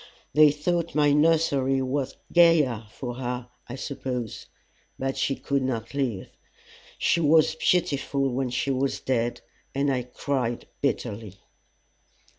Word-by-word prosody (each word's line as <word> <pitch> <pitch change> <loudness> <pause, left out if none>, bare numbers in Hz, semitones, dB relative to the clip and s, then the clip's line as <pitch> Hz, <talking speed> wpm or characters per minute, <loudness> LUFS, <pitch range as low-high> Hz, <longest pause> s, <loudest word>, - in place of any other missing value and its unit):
They 150 +1 +7
thought 170 +3 -1
my 145 -1 +4
nursery 145 -4 +3
was 130 +1 -2 0.2
gayer 150 -10 +4
for 120 +2 -6
her, 125 -1 -4 0.2
I 120 - -5
suppose; 130 -4 -5 0.5
but 135 0 -2
she 135 - 0
could 140 0 -1
not 120 -3 -3
live. 125 -9 -2 0.7
She 170 - +2
was 155 0 +4
beautiful 140 -4 +1
when 130 0 -1
she 125 +3 -1
was 135 +1 0
dead, 120 -2 -1 0.3
and 140 0 +1
I 125 - 0
cried 125 -1 -3 0.2
bitterly. 110 -7 -2
135 Hz, 125 wpm, -26 LUFS, 125-145 Hz, 0.7 s, They